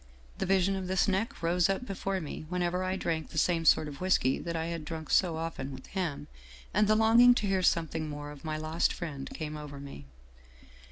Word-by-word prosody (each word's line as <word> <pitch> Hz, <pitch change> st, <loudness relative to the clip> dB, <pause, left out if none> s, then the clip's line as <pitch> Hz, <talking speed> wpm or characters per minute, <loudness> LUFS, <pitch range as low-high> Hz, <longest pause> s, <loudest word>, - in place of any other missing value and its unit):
The -, -, -1 dB
vision 195 Hz, 0 st, +3 dB
of 190 Hz, -1 st, -4 dB
this 190 Hz, +2 st, +2 dB
neck 195 Hz, -1 st, -1 dB
rose 175 Hz, +2 st, +2 dB
up 195 Hz, +6 st, -1 dB
before 195 Hz, -2 st, -2 dB
me 155 Hz, -1 st, -7 dB
whenever 180 Hz, 0 st, -1 dB
I 185 Hz, 0 st, -1 dB
drank 165 Hz, -4 st, -2 dB
the -, -, -8 dB
same 165 Hz, 0 st, +2 dB
sort 155 Hz, -, +5 dB
of 145 Hz, +1 st, -9 dB
whisky 180 Hz, -8 st, +2 dB
that 170 Hz, -1 st, -4 dB
I 160 Hz, 0 st, -1 dB
had 165 Hz, -1 st, -4 dB
drunk 160 Hz, 0 st, -6 dB
so 170 Hz, -4 st, +3 dB
often 160 Hz, -4 st, -4 dB
with 130 Hz, -1 st, -9 dB
him, 160 Hz, -7 st, -3 dB, 0.5 s
and 210 Hz, +2 st, +3 dB
the 215 Hz, -, +4 dB
longing 230 Hz, +3 st, +6 dB
to 215 Hz, -, -1 dB
hear 195 Hz, -1 st, +1 dB
something 160 Hz, -3 st, +1 dB
more 145 Hz, 0 st, -6 dB
of 145 Hz, -2 st, -12 dB
my 155 Hz, -1 st, -3 dB
lost 155 Hz, +2 st, 0 dB
friend 145 Hz, -6 st, -6 dB
came 155 Hz, -1 st, -5 dB
over 150 Hz, -2 st, -8 dB
me. 140 Hz, -, -9 dB
170 Hz, 215 wpm, -30 LUFS, 155-190 Hz, 0.5 s, longing